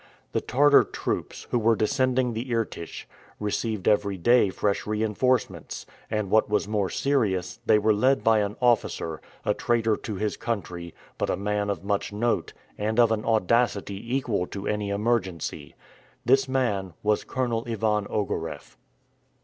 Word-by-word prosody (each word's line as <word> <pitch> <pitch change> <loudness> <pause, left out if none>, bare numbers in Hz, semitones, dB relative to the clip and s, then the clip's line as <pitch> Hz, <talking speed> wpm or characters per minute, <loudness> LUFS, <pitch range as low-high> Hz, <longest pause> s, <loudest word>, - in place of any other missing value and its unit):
The - - 0
Tartar 145 +4 +5
troops, - - -4
who 120 - +2
were 115 0 +3
descending 125 +2 +1
the 115 +3 -3
Irtych, 115 -7 -3 0.3
received 105 -1 -2
every 100 -2 +2
day 120 +3 +4
fresh 100 +2 -1
reinforcements, 110 +4 -1 0.2
and, 105 -3 -2
what 110 -1 +4
was 105 -1 +1
more 105 -3 0
serious, 95 -9 0
they - - +6
were 105 +1 +3
led 130 +6 +2
by 110 -1 +4
an 105 0 -1
officer, 110 -9 +1 0.2
a - - +3
traitor 115 -2 +1
to 105 - -6
his 105 +2 -2
country, 90 -7 -4 0.2
but - - 0
a - - 0
man 105 0 -1
of 95 -4 -3
much 100 0 -1
note, 115 +3 0 0.3
and 110 +3 0
of 115 -2 +5
an 110 -1 0
audacity 115 0 +1
equal 110 -9 0
to 100 -1 -6
any 105 -1 -1
emergency. 100 -8 -2 0.5
This 135 +2 +4
man 100 -9 -1
was 105 0 +2
Colonel 120 -3 -1
Ivan 105 -2 0
Ogareff. 80 - -4
105 Hz, 150 wpm, -26 LUFS, 100-120 Hz, 0.5 s, they